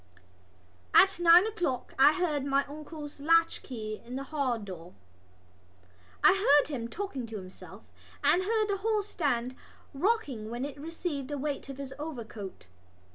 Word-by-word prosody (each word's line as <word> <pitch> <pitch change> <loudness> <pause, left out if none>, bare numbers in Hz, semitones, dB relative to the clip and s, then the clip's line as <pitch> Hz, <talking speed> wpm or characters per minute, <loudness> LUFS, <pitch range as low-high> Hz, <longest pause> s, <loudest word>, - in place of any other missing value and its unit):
At 385 -2 +6
nine 345 +2 +7
o'clock 350 - -2
I 285 +3 +7
heard 310 -6 0
my 275 0 +1
uncle's 295 0 -9
latchkey 280 -8 +1
in 245 +2 -8
the 270 - -3
halldoor. 225 - -3 1.3
I - - +8
heard 295 -8 +4
him 240 -6 -3
talking 270 - -5
to 220 -1 -6
himself 185 -1 -11 0.4
and 360 - +4
heard 430 +2 +1
the 400 - 0
hallstand 345 - -1 0.4
rocking 275 - -1
when 240 +3 -3
it 285 - -5
had 285 - -12
received 325 -4 -4
the 290 0 -4
weight 285 0 -4
of 270 - -7
his 275 -1 -6
overcoat. 230 - -7
285 Hz, 140 wpm, -29 LUFS, 245-340 Hz, 1.3 s, I